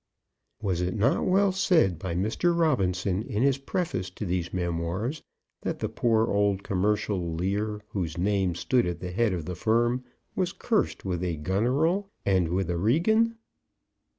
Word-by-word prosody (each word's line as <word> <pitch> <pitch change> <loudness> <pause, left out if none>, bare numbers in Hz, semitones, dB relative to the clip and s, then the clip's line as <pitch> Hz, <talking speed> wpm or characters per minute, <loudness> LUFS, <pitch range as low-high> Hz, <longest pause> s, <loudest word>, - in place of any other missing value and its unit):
Was 90 -4 0
it 90 +1 -1
not 110 +6 +2
well 195 +1 +4
said 175 - +2
by 85 -1 -3
Mr. 110 - +1
Robinson 95 - +1
in 110 0 -2
his 140 -1 +3
preface 135 - -2
to 105 - -6
these 90 -1 -2
memoirs, 90 - -2 0.4
that - - -2
the - - -2
poor 115 -2 +2
old 100 -1 +1
commercial 95 -3 0
Lear, 105 +4 -1
whose 90 -6 -3
name 95 -1 +1
stood 120 +5 +1
at 85 -1 -3
the 90 0 -5
head 110 +3 +1
of 85 -4 -3
the 90 - -4
firm, 120 +6 +1 0.3
was 185 -2 0
cursed 225 - -1
with 90 -2 -2
a 85 -2 -1
Goneril, 135 - +1 0.2
and 95 -4 +2
with 90 0 0
a 85 - -1
Regan? 220 - +2
100 Hz, 160 wpm, -27 LUFS, 90-130 Hz, 0.4 s, well